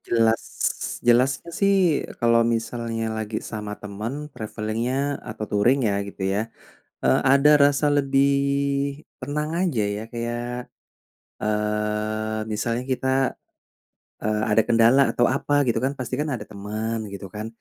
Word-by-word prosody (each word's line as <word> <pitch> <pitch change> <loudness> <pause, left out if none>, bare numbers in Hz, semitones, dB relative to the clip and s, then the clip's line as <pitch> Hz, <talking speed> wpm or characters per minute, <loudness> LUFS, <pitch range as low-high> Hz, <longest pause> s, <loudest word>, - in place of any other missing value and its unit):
Jelas 115 -1 +2 0.6
jelasnya 130 +7 +3
sih 200 +2 +2 0.4
kalau 115 -1 +4
misalnya 115 -1 -3
lagi 110 0 -3
sama 105 -1 -5
teman, 115 +9 -6
traveling-nya 115 +6 -2
atau 110 0 -5
touring 120 +6 +3
ya 100 -1 +1
gitu 100 -1 -8
ya, 105 - +1 0.6
eee, 65 0 +4
ada 140 +3 +6
rasa 145 +1 +4
lebih 140 -1 +3 0.9
tenang 150 +3 -2 0.2
aja 120 -11 0
ya 110 - -5
kayak, 120 +1 -4 0.7
eee, 105 +1 -1
misalnya 115 +3 -1
kita, 130 0 -1 1.2
eee, 105 0 0
ada 110 +1 +5
kendala 115 +4 +5
atau 120 - +3
apa 145 +2 +1
gitu 115 - +1
kan, 135 - +1
pasti 125 0 -3
kan 150 0 -1
ada 115 - -5
teman, 110 +2 -4
gitu 100 0 -7
kan. 105 +1 -4
115 Hz, 130 wpm, -24 LUFS, 110-130 Hz, 1.2 s, ada